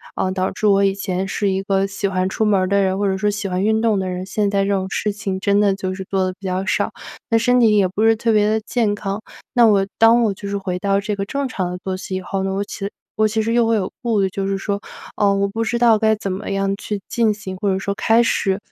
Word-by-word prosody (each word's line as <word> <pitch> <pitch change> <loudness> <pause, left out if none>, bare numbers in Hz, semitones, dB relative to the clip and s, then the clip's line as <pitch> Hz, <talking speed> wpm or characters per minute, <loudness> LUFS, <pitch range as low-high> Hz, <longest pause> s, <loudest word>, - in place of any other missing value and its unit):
嗯， 185 0 -1
导 185 0 -1
致 215 - -1
我 200 0 +4
以 195 -1 +3
前 190 -1 -3
是 200 +1 -1
一 190 0 -1
个 195 0 +1
喜 200 +1 -4
欢 185 -1 0
出 205 +3 -1
门 205 -3 +3
儿 185 - 0
的 200 +1 +2
人 190 0 +1
或 205 - +1
者 190 0 0
说 210 +2 +1
喜 205 -1 -3
欢 185 0 -1
运 220 +1 +2
动 220 -3 +2
的 190 -1 -2
人， 180 0 -4
现 200 +1 -1
在 200 -1 +2
这 200 - -2
种 190 -1 0
事 210 +1 -1
情 200 -2 -4
真 200 +1 +2
的 200 -2 +3
就 185 -1 -4
是 190 - -6
做 190 -1 +1
得 185 - -2
比 195 +1 -14
较 185 +1 -1
少， - - 0 0.4
那 230 - +4
身 245 +2 +3
体 215 -2 +5
也 195 -2 +4
不 195 +4 -2
是 225 0 +6
特 230 0 +1
别 210 0 +3
地 220 0 +1
健 220 -2 0
康。 200 +1 -4 0.3
那 240 -2 +6
我 200 -2 +3
当 230 +1 +5
我 210 -3 +1
就 200 +1 -7
是 200 - -1
回 185 -2 -3
到 195 0 +1
这 210 +1 -3
个 195 - -3
正 275 +5 -2
常 185 -7 -3
的 180 - -5
作 185 +1 -4
息 185 0 -5
以 - - -5
后， 195 +2 -3
我 195 +1 -1
其 200 0 -5 0.3
我 215 0 +3
其 220 +1 0
实 225 +1 -1
又 235 -1 +3
会 230 - +3
有 195 -4 -1
顾 230 -5 +1
虑 190 - +1
就 195 +1 -3
是 195 0 -1
说， 200 +1 -2 0.4
呃， 200 -1 +3
我 200 0 +1
不 225 +3 -3
知 235 +2 -1
道 230 -3 +4
该 220 -1 +3
怎 200 -3 -4
么 190 +1 -4
样 195 0 0
去 210 -1 -4
进 225 -3 +2
行， 190 -3 -7
或 200 +1 -1
者 190 - 0
说 200 +1 -2
开 225 +3 +3
始、 195 -4 +1
200 Hz, 315 characters per minute, -20 LUFS, 190-215 Hz, 0.4 s, 是